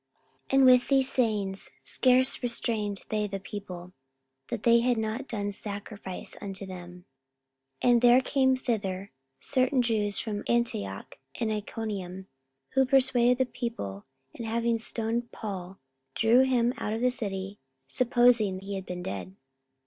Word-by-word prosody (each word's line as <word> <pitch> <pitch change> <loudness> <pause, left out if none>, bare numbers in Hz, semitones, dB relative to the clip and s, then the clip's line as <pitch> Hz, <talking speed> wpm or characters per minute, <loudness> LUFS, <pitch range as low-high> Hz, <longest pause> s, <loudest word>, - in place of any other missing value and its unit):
44:014:018 - - -6
And 270 - +7
with 250 -1 +6
these 270 -1 +2
sayings 210 -6 -1
scarce 255 0 +3
restrained 225 -4 -2
they 210 -1 0
the 195 -1 -4
people, 185 -3 -8 0.6
that 235 -3 -4
they 235 0 +6
had 245 0 +2
not 220 +5 -2
done 205 -2 -3
sacrifice 200 -2 -7
unto 195 -1 -6
them. 180 -1 -10 0.8
44:014:019 245 - +5
And 240 -1 +5
there 245 +1 +7
came 260 -1 +2
thither 200 -6 -2 0.3
certain 255 - +1
Jews 210 -3 +1
from 210 -2 -3
Antioch 100 - -1 0.2
and 225 -2 0
Iconium, 200 -3 -4 0.4
who 265 0 +3
persuaded 255 -2 +3
the 260 - +2
people, 230 - -5 0.3
and 230 - -6
having 230 0 +1
stoned 230 +1 -2
Paul, 190 -3 -6 0.4
drew 225 +3 +5
him 245 -2 +2
out 210 - -2
of 225 - -2
the 250 0 +3
city, 195 -3 -5 0.3
supposing 235 - +3
he 195 +1 -6
had 190 -1 -5
been 180 0 -5
dead. 190 0 -5
220 Hz, 145 wpm, -28 LUFS, 195-245 Hz, 0.8 s, And